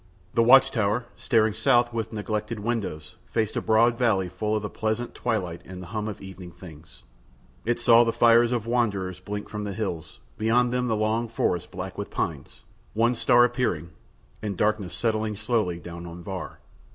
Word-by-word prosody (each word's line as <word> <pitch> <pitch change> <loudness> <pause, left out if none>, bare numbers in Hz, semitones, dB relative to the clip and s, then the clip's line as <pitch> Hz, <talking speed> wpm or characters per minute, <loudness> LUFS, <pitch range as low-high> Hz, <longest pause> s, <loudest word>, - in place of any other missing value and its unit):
The 115 - +3
watch 130 +3 +7
tower, 110 +2 0
staring 110 -2 +2
South 120 0 +3
with 115 -2 -3
neglected 105 +1 -3
windows, 105 -9 -4
faced 110 -2 -1
a - - 0
broad 115 +2 +3
valley 100 -7 +2
full 105 +4 -2
of 105 - -2
the - - -2
pleasant 110 +2 -2
twilight 95 -8 -2
and 90 0 -9
the 90 - -8
hum 110 -1 -2
of 105 - -6
evening 95 -2 -9
things: 80 -7 -14 0.6
it 120 +1 0
saw 120 0 +6
the 115 - +1
fires 115 0 +5
of 120 -3 -1
wanderers 100 -7 -1
blink 105 +2 -6
from 105 -1 -5
the 100 -1 -4
hills, 95 -6 -5 0.2
beyond 120 +3 +2
them 125 0 0
the 110 - +1
long 110 +2 0
forest 90 -5 -1
black 95 +1 -7
with 100 - -4
pines, 75 -5 -4 0.3
one 115 +2 +3
star 120 +1 +5
appearing, 120 - -1 0.5
and 100 -4 -4
darkness 105 -5 0
settling 110 -2 0
slowly 110 -5 0
down 85 0 -8
on 85 +1 -9
Var. 95 -1 -6
110 Hz, 180 wpm, -26 LUFS, 95-115 Hz, 0.6 s, watch